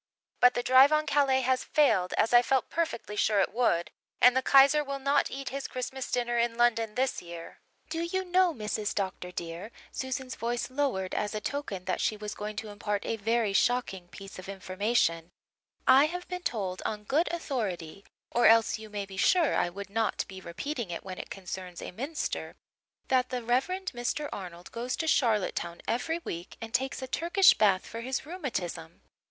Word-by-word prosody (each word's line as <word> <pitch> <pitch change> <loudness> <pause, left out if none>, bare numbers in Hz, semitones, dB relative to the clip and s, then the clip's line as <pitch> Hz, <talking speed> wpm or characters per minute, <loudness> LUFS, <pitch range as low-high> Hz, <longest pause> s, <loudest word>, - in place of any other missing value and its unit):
But 250 0 +6
the 245 - 0
drive 260 +3 +7
on 305 0 +3
Calais 275 -3 +3
has 255 0 +1
failed, 215 -12 +2
as 225 - +2
I 240 - +9
felt 265 +1 0
perfectly 275 -10 -2
sure 210 0 +2
it 195 - +1
would, 195 -8 +1 0.3
and 250 +1 +7
the 260 - +3
Kaiser 275 +3 +6
will 275 -1 -4
not 280 +1 +2
eat 270 0 -5
his 275 +1 -4
Christmas 255 +1 -5
dinner 240 -1 0
in 235 0 0
London 230 -2 +2
this 260 +1 0
year. 170 -1 -10 0.3
Do 325 +1 -3
you 375 +3 -2
know, 365 0 +3
Mrs. 215 -5 -3
Dr. 190 -2 -3
dear," 170 +3 -6 0.2
Susan's 260 0 -4
voice 240 +2 -3
lowered 255 -10 -1
as 210 +1 -2
a - - -1
token 210 -7 -4
that 185 - -1
she 215 - 0
was 210 0 -5
going 210 0 -5
to 220 0 -5
impart 205 0 -3
a - - -1
very 225 -1 0
shocking 195 -5 +1
piece 195 +1 -10
of 185 - -9
information, 185 -3 0 0.6
"I 265 +2 +7
have 360 +2 -6
been 360 0 -5
told 195 - -3
on 210 -1 -3
good 300 - +1
authority 200 - -4 0.3
or 240 - +4
else 225 -1 +5
you 220 0 -10
may 205 -1 -4
be 195 -1 -11
sure 335 - +3
I - - +1
would 200 +2 -8
not 225 +1 0
be 190 -1 -9
repeating 230 - -4
it 170 - -5
when 185 -1 -7
it - - -7
concerns 185 -2 -7
a - - -6
minster 275 - -4 0.5
that 255 -1 +2
the 250 -1 -3
Rev. 245 +3 +2
Mr. 300 -6 -3
Arnold 175 -2 -8
goes 245 +2 -3
to 320 - -3
Charlottetown 215 - +1
every 285 +8 0
week 170 +1 -6
and 225 -1 -8
takes 265 +1 -1
a - - -4
Turkish 345 +7 +5
bath 195 -3 +3
for 230 - -7
his 260 +3 -3
rheumatism. 230 - -5
235 Hz, 190 wpm, -29 LUFS, 195-270 Hz, 0.6 s, I